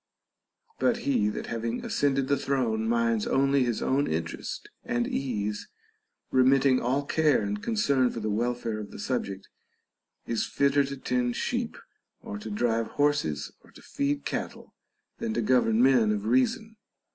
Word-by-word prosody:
But 245 -2 +2
he 110 -7 +2
that - - -5
having 115 0 -3
ascended 135 -2 +1
the 140 - +3
throne 115 -6 0
minds 115 -2 +1
only 140 0 +3
his 120 -3 -1
own 140 +2 +1
interest 80 +1 -4 0.2
and 120 0 -1
ease, 105 -6 -2 0.6
remitting 130 0 +4
all 135 +4 0
care 150 -6 +2
and 100 +1 -3
concern 140 - +2
for 115 - -5
the 110 - -3
welfare 115 0 -1
of 105 -1 -7
the - - -10
subject, 100 -4 -3 0.8
is 115 -2 -1
fitter 140 0 +2
to 140 0 -6
tend 125 -2 -1
sheep - - -2 0.4
or 100 - -7
to 110 - -7
drive 115 +1 0
horses 145 - +1
or - - -20
to - - -16
feed 140 0 -2
cattle - - -5 0.5
than 110 - -2
to 120 - +1
govern 120 -1 +3
men 125 -5 +5
of 105 -1 -2
reason. 130 - +1
120 Hz, 155 wpm, -27 LUFS, 110-140 Hz, 0.8 s, men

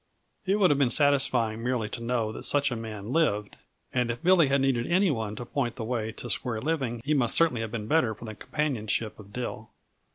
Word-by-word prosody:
It 195 - +3
would 195 -6 +4
have 145 - +2
been 135 -3 +3
satisfying 130 -6 +3
merely 120 -2 -1
to 115 - -6
know 115 -2 -1
that - - -8
such 145 -1 +2
a - - -1
man 110 0 -6
lived, 105 -11 +1 0.4
and 125 -1 +1
if 120 0 -4
Billy 175 -3 +5
had 140 +1 +2
needed 130 -3 +1
any 185 +1 +3
one 110 -5 -3
to 120 - -6
point 120 -2 -2
the 115 - -5
way 110 -1 -2
to 120 - -8
square 120 -2 -1
living 130 -5 -2
he 150 - +1
must 125 -6 +3
certainly 160 -9 +3
have 115 - -3
been 110 -2 -4
better 125 -7 +2
for 115 - -11
the 110 - -6
companionship 110 -4 -2
of 100 -1 -13
Dill. 110 -2 -5
120 Hz, 225 wpm, -27 LUFS, 110-145 Hz, 0.4 s, Billy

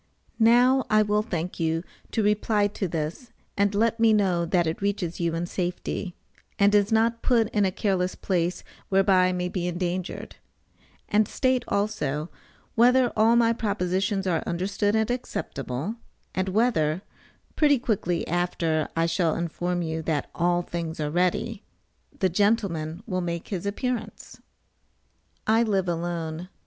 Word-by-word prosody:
Now 245 +4 +5
I 215 0 +5
will 210 0 +1
thank 180 -5 -4
you 165 0 0 0.3
to 225 - 0
reply 210 0 +2
to 195 -1 -3
this 165 - -4 0.2
and 200 0 +1
let 230 +2 +2
me 225 -1 +5
know 185 -5 +2
that 175 0 +2
it 160 +3 -3
reaches 195 -4 -2
you 170 -1 0
in 170 +1 -2
safety, 180 +1 -3 0.4
and 200 0 +4
is 205 0 +3
not 230 +1 +2
put 230 -4 +2
in 205 -2 +2
a 190 - +1
careless 185 -2 0
place, 180 -2 -1 0.3
whereby 190 -1 +4
I - - +1
may 180 0 -1
be 180 -1 -3
endangered; 180 +1 -4 0.7
and 210 0 +3
state 255 -2 +1
also, 165 -7 -1 0.4
whether 250 +1 +4
all 225 +2 +4
my 230 -1 +4
propositions 195 -2 -1
are 175 -3 +1
understood 200 +4 0
and 220 +1 +1
acceptable, 165 - -4 0.4
and 190 0 -1
whether, 185 -6 +1 0.5
(pretty 290 -2 +4
quickly 195 -8 -1
after 165 -2 0
I 165 0 +2
shall 165 -1 +1
inform 175 +1 -2
you 160 0 -3
that 155 -2 -2
all 175 +1 +1
things 170 -2 -5
are 150 -1 -1
ready), 185 +6 0 0.6
the 190 - +2
gentleman 185 -3 0
will 185 -4 -2
make 170 -1 -4
his 195 -1 -3
appearance? 245 +3 -4 1.0
I 220 +1 +4
live 195 -5 +1
alone. 170 0 -3
185 Hz, 150 wpm, -26 LUFS, 170-215 Hz, 1.0 s, Now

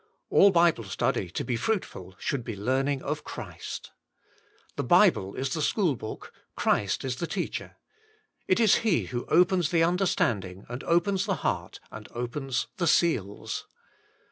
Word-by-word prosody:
All 200 - +7
Bible 170 -9 +3
study 95 -1 -1
to - - -3
be 125 - -1
fruitful 115 - -3
should 135 -4 -2
be 115 -2 -5
learning 130 +6 0
of 150 +1 -3
Christ. - - -7 0.8
The - - -2
Bible 95 +1 +4
is 135 +1 -2
the 155 - -2
school 170 -2 +1
book, 110 -2 -8 0.2
Christ 100 +5 +1
is 125 -1 -2
the 170 - -3
Teacher. - - -4 0.7
It 185 - +3
is 220 -4 +5
He 215 -8 +1
who 120 -1 -5
opens 180 -1 +3
the 165 -1 +3
understanding, 110 - 0
and 120 +2 -6
opens 190 +4 +2
the 195 - +1
heart, - - -2
and 105 -1 -9
opens 125 +1 -2
the 175 -3 0
seals. 120 - 0
140 Hz, 150 wpm, -27 LUFS, 115-175 Hz, 0.8 s, All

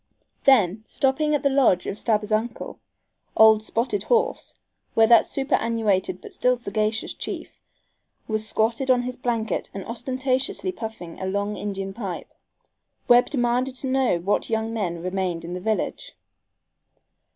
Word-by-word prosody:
Then, 215 -6 +4
stopping 295 +3 +1
at 290 - -2
the 280 - +4
lodge 250 -10 +3
of 200 - -4
Stabbers's 215 -2 0
uncle, 225 +2 -2 0.6
old 220 -1 +7
"Spotted 225 -2 -1
Horse," 470 - 0 0.4
where 225 - +6
that 230 0 +6
superannuated 225 -8 0
but - - -10
still 250 0 +2
sagacious 215 0 -1
chief - - -7 0.7
was 215 0 -1
squatted 230 +5 0
on 250 -1 +4
his 250 0 -3
blanket 230 -3 -2
and 195 - -5
ostentatiously 255 +7 -2
puffing 220 - -8
a 190 - -2
long 200 +2 -1
Indian 195 -2 -4
pipe, 195 -5 -6 0.7
Webb 245 0 +6
demanded 250 0 0
to 265 - -3
know 260 -7 +2
what 190 +4 -1
young 225 0 -1
men 175 -6 -3
remained 180 -2 -2
in 175 - -6
the 180 - -5
village. 220 - -2
225 Hz, 140 wpm, -24 LUFS, 200-255 Hz, 0.7 s, old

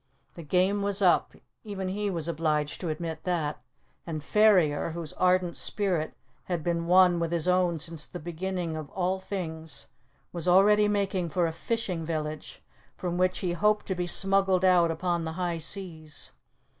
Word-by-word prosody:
The 170 - -9
game 185 +6 +1
was 200 0 0
up 185 -3 +3 0.3
even 195 -3 -4
he 205 +2 -1
was 170 -4 -2
obliged 155 -2 -1
to 175 - -2
admit 160 0 -4
that 160 -5 -1 0.5
and 155 -3 -4
Ferrier, 180 -8 +3
whose 165 -2 -6
ardent 180 -1 +2
spirit 180 -7 -1 0.3
had 175 -4 -2
been 170 -1 -1
one 180 -1 +6
with 170 -1 -1
his 170 -1 0
own 180 -2 +3
since 160 0 -4
the 175 - -8
beginning 175 0 -3
of 155 -2 -6
all 185 0 0
things, 160 -5 -5 0.4
was 170 -1 -4
already 210 +3 +6
making 195 -4 0
for 175 +1 +1
a 165 - -2
fishing 185 -1 -2
village, 155 -1 -5 0.3
from 175 -1 -3
which 185 0 +1
he 175 - 0
hoped 210 +4 +2
to 190 - -1
be 180 -1 -2
smuggled 195 0 +2
out 175 -2 +5
upon 170 +1 -1
the 160 0 -4
high 175 -1 -2
seas. 160 -3 -5
175 Hz, 170 wpm, -28 LUFS, 165-190 Hz, 0.5 s, one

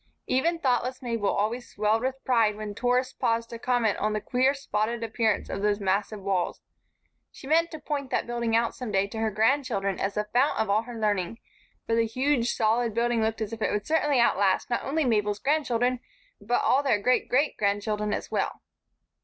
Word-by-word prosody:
Even 330 +7 +1
thoughtless 255 -3 -1
Mabel 230 -4 -1
always 225 +5 -1
swelled 215 +2 +1
with 260 +1 -3
pride 225 -4 +3
when 210 -1 -6
tourists 250 +3 0
paused 230 0 -1
to 230 - -7
comment 240 -4 +1
on 210 +1 0
the 215 - 0
queer, 255 +5 +1
spotted 230 -3 -2
appearance 220 -1 0
of - - -4
those 205 0 +1
massive 200 +1 -1
walls. 190 -3 -1 0.7
She - - -13
meant 330 +4 +3
to 315 - -7
point 285 -3 -4
that - - 0
building 235 -1 -1
out 230 0 +2
some 250 -4 -6
day 195 -1 +2
to 220 +2 -7
her 220 0 +1
grandchildren 220 -3 0
as 195 0 -2
the 210 - 0
fount 260 +4 +3
of 220 -2 0
all 210 +2 +3
her 235 0 -9
learning; 205 -1 0 0.5
for 230 - -1
the 230 0 +2
huge, 255 +1 0
solid 225 0 +1
building 235 0 +1
looked 220 0 -1
as 220 +1 -3
if 225 - -7
it - - +1
would 205 -1 -2
certainly 295 -4 +2
outlast 205 -2 +2
not 240 - 0
only 305 +2 0
Mabel's 210 -3 +1
grandchildren 250 -2 +1 0.4
but 235 +4 0
all 270 - +4
their 270 -7 +2
great 250 +5 +1
great 280 +5 +2
grandchildren 210 +1 -1
as - - -4
well. - - -2
230 Hz, 200 wpm, -27 LUFS, 210-255 Hz, 0.7 s, all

